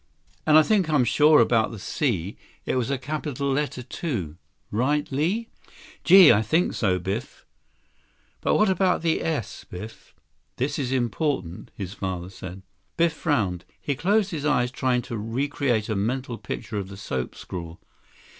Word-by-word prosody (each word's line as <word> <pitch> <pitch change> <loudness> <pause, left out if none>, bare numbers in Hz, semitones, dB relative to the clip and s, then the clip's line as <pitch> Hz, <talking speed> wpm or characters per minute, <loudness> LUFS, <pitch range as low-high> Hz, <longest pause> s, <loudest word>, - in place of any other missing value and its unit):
"And 155 0 +7
I 155 - +8
think 195 -3 +2
I'm 150 -5 +4
sure 150 +4 +5
about 115 -1 +3
the 115 - -8
C. 100 - -2 0.3
It - - -1
was 125 0 0
a 140 - 0
capital 140 0 -3
letter, 135 -2 -1
too. 120 - -4 0.4
Right, 140 +7 +1
Li?" 180 +12 0 0.6
"Gee, 185 -2 +9
I 105 - +3
think 160 - +1
so, 95 -5 +1
Biff." 95 +7 -5 1.0
"But - - +2
what 215 - +4
about 185 -2 +2
the 165 -1 +1
s, 150 -10 -3
Biff? 105 +5 -10 0.4
This 145 +4 -2
is 130 -3 -2
important," 120 - -1
his 95 -2 -6
father 95 -2 -4
said. 95 0 -9 0.3
Biff 170 -1 +3
frowned. 105 - 0 0.2
He 145 - -2
closed 200 +8 +1
his 155 -4 -4
eyes 125 -5 +2
trying 130 -1 0
to 120 - -6
recreate 120 0 -1
a 110 - -1
mental 120 +4 -2
picture 105 - -5
of 95 - -5
the 100 0 -10
soap 65 -10 -4
scrawl. 85 -2 -7
125 Hz, 160 wpm, -25 LUFS, 100-150 Hz, 1.0 s, Gee